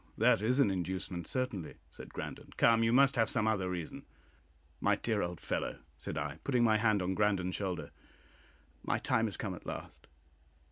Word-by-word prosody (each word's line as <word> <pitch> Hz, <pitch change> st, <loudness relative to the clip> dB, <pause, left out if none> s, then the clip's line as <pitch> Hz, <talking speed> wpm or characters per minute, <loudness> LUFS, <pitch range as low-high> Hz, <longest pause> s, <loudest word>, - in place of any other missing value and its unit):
"That -, -, +4 dB
is 125 Hz, +5 st, +2 dB
an 135 Hz, -8 st, +5 dB
inducement, 90 Hz, -2 st, -3 dB
certainly," 125 Hz, -10 st, -3 dB, 0.2 s
said -, -, -10 dB
Grandon. -, -, -7 dB
"Come, 115 Hz, -1 st, +5 dB
you 115 Hz, 0 st, +3 dB
must 135 Hz, +2 st, +5 dB
have 115 Hz, -, +3 dB
some 110 Hz, -3 st, +1 dB
other 100 Hz, -4 st, +1 dB
reason!" 90 Hz, -3 st, -5 dB, 0.7 s
"My -, -, +3 dB
dear 110 Hz, -3 st, -1 dB
old 85 Hz, -1 st, -3 dB
fellow," -, -, -2 dB, 0.2 s
said 75 Hz, -, -5 dB
I, 75 Hz, +1 st, -3 dB
putting 125 Hz, -4 st, +2 dB
my 110 Hz, -2 st, +5 dB
hand 105 Hz, -3 st, +2 dB
on 90 Hz, +1 st, 0 dB
Grandon's 95 Hz, -2 st, +1 dB
shoulder, 95 Hz, -3 st, -3 dB, 0.9 s
"my -, -, 0 dB
time 115 Hz, 0 st, +1 dB
is 100 Hz, -, -5 dB
come 100 Hz, -3 st, -3 dB
at 90 Hz, -, -10 dB
last. -, -, -7 dB
105 Hz, 180 wpm, -33 LUFS, 90-115 Hz, 0.9 s, an